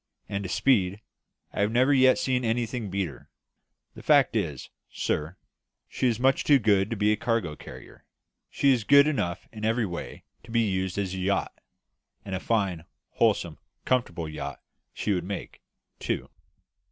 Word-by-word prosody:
As 100 0 -3
to 95 - -5
speed, 100 -7 +2 0.5
I - - -1
have 105 +1 +2
never 130 +4 +4
yet 130 -1 +5
seen 130 -6 0
anything 115 -1 -1
beat 95 -1 -1
her. 70 -6 -13 0.6
The - - -11
fact - - +4
is, - - -3 0.2
sir, 80 +5 -2 0.5
she 130 - -1
is 115 -2 0
much 135 +2 +3
too 145 - +6
good 100 -4 +2
to 115 - -2
be 105 0 +2
a - - +3
cargo 110 -8 -1
carrier; - - -12 0.5
she 140 -1 +3
is 120 -4 -1
good 140 +4 +7
enough 105 - -2
in 110 -1 -8
every 115 +1 +1
way 85 -3 -7 0.2
to 120 - -18
be 115 0 +2
used 95 -3 -1
as 95 -2 -2
a 95 - -4
yacht; 95 +1 0 0.7
and 95 - -6
a 95 - -1
fine, 95 -7 -1 0.3
wholesome, - - +1 0.3
comfortable 90 -10 0
yacht 70 -2 -6 0.3
she 105 - -1
would 90 -2 -1
make, 100 +2 -6 0.4
too." - - -3
105 Hz, 170 wpm, -27 LUFS, 95-120 Hz, 0.7 s, good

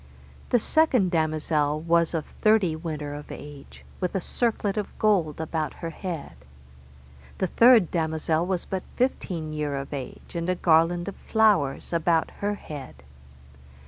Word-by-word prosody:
The 245 - +4
second 250 - +2
damosel 155 -2 +1
was 170 +1 +2
of 160 - -2 0.2
thirty 215 -7 +4
winter 155 -3 -5
of 145 0 -8
age, 145 -1 -11
with 180 +1 -2
a - - +2
circlet 215 0 -1
of 210 -2 -4
gold 180 -9 +2
about 160 -1 -2
her 165 - -5
head. 165 - -6 1.0
The - - 0
third 230 0 +5
damosel 160 0 0
was 185 -2 -1
but 190 -1 -3
fifteen 175 -11 -1
year 150 -2 -2
of 140 +1 -5
age, 135 -3 -7
and 170 +1 -2
a 185 - +2
garland 175 +1 +3
of 200 - -5
flowers 205 -11 +2
about 165 -1 +2
her 205 +1 -1
head. 145 - -9
165 Hz, 145 wpm, -26 LUFS, 155-195 Hz, 1.0 s, third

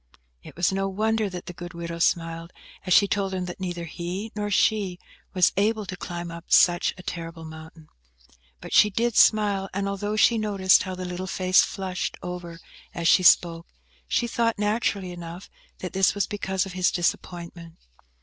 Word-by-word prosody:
It - - -13
was 175 +2 +1
no 195 0 -1
wonder 215 +2 0
that 180 -1 -7
the 180 - -7
good 175 0 -9
widow 170 0 -6
smiled, 165 0 0 0.4
as - - -2
she 200 - +6
told 195 -1 -1
him 185 -1 -2
that 180 +1 -7
neither 175 -2 -4
he 180 +6 -5
nor 205 -1 -2
she 200 -3 +1 0.4
were 185 - -1
able 215 +1 +1
to 185 - -6
climb 175 -1 -6
up 170 0 -9
such 175 -1 +4
a 185 - -11
terrible 165 -2 -6
mountain. 160 0 -12 0.7
But - - -8
she 210 - +6
did 230 +2 -1
smile; 205 -3 +4
and 200 0 -1
although 205 +2 -3
she 225 +1 +4
noticed 195 -3 +3
how 185 -1 -4
the 185 0 -6
little 180 +1 -5
face 185 0 +3
flushed 185 -2 -4
over 175 -2 -7 0.4
as 170 -1 -1
she 185 - +6
spoke, 170 -2 +4 0.4
she 240 - +1
thought, 230 -1 0
naturally 205 -3 -1
enough, 175 +1 -9 0.3
that 185 - -5
this 190 +1 +3
was 200 - +1
because 190 -2 -2
of 190 - -8
his 180 -1 +2
disappointment. 170 -1 -3
185 Hz, 180 wpm, -25 LUFS, 175-200 Hz, 0.7 s, she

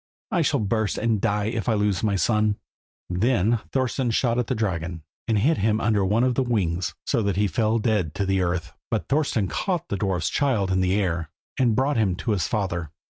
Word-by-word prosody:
I - - +2
shall - - +1
burst 110 +1 0
and 110 -2 0
die 105 +1 +1
if 115 +2 -2
I 110 - +3
lose 105 -3 +1
my 105 -2 +1
son." 105 +1 +2 0.5
Then 110 +3 +2
Thorston 130 -1 0
shot 115 +1 +1
at 120 - -1
the 130 - -1
dragon, 85 -6 -2 0.2
and 110 -2 +2
hit 145 +11 +2
him 110 +2 +2
under 110 -3 +2
one 105 +5 +2
of 130 -1 +2
the 135 - +1
wings, 90 -10 -1
so - - +1
that 100 -3 0
he 105 +2 +2
fell 110 +2 +1
dead 105 -9 0
to 100 - -1
the 95 0 +1
earth; 85 -2 -2 0.2
but - - -1
Thorston 135 -8 +1
caught 180 - -2
the 100 - -1
dwarf's 90 -5 -1
child 115 -10 +1
in 95 0 +2
the 95 +1 +2
air, 85 -4 -1 0.3
and 120 -4 +3
brought 135 +2 +1
him 100 -5 +2
to 110 - -2
his 95 -6 0
father. 85 -7 -2
105 Hz, 215 wpm, -24 LUFS, 95-115 Hz, 0.5 s, I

